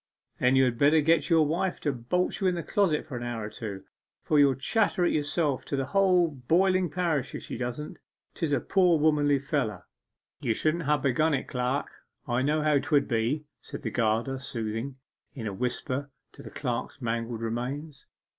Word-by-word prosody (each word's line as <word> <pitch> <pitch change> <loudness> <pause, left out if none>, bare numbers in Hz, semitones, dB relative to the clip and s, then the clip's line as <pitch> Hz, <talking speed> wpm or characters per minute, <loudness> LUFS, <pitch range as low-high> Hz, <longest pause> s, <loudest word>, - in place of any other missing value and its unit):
'Then 125 +1 +3
you 130 0 +5
had 120 -2 -1
better 150 +3 +5
get 160 +1 +2
your 165 -2 +5
wife 175 +5 -1
to 145 - 0
bolt 130 +9 -1
you 190 - +3
in 180 - +2
the 170 - -3
closet 190 -9 +1
for 150 -5 -7
an - - -6
hour 120 -2 -4
or 105 - -7
two, 100 -5 -6 0.4
for 150 - +3
you'll 140 -2 +5
chatter 185 +5 +1
it - - +2
yourself 145 -2 0
to - - -3
the 135 -1 -1
whole 185 +1 +3
boiling 175 +6 +2
parish 160 -5 -1
if - - -6
she - - -6
don't! 125 +5 -5 0.3
'Tis 160 -3 -2
a 140 - +3
poor 180 +3 +3
womanly 150 -2 +3
feller!' 130 - -2 0.5
'You 115 - 0
shouldn't 155 +4 0
ha' 150 +1 +2
begun 145 +4 +2
it, 130 - -4
clerk. 125 +2 -1 0.4
I 120 0 +1
knew 150 +3 +1
how 150 -2 +3
'twould 145 0 +1
be,' 120 +6 0 0.2
said - - -8
the - - -2
gardener 115 +3 0
soothingly, 115 +1 -4 0.4
in 120 -5 -6
a 105 - -3
whisper 130 +5 -2 0.2
to - - -13
the - - -9
clerk's - - -4
mangled 115 0 -3
remains. 135 +6 -4
140 Hz, 195 wpm, -28 LUFS, 125-160 Hz, 0.5 s, you